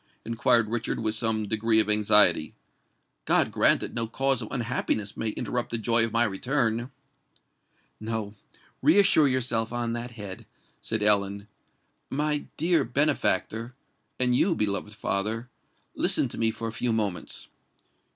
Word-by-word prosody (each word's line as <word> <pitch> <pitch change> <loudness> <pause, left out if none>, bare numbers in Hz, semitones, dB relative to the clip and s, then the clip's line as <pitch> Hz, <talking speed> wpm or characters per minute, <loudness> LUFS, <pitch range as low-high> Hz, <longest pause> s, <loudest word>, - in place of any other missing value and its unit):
inquired 115 0 +2
Richard 115 +1 -3
with 110 -1 -1
some 110 -1 -1
degree 110 +1 +2
of 110 - +2
anxiety. 105 -6 +3 0.7
"God - - +3
grant - - +3
that - - -6
no 115 -1 0
cause 135 +2 0
of 110 - -6
unhappiness 115 -4 -2
may 115 - -2
interrupt 120 +3 -3
the 115 - -1
joy 115 +1 +3
of 115 - -1
my 115 +1 +2
return!" 120 +2 -1 1.1
"No—reassure 115 - +1
yourself 120 -4 -1
on 120 -1 -2
that 120 +1 -4
head," 105 -2 -9 0.3
said 110 -2 -2
Ellen. 100 -1 +2 0.6
"My 150 +1 -1
dear 165 -1 +2
benefactor—and 125 -1 -1
you, 170 +6 +2
beloved 105 -2 -2
father—listen 110 +6 -2
to - - -7
me 115 - +3
for 115 +1 -5
a - - -4
few 120 +2 -1
moments. 105 -5 -3
115 Hz, 130 wpm, -26 LUFS, 105-125 Hz, 1.1 s, anxiety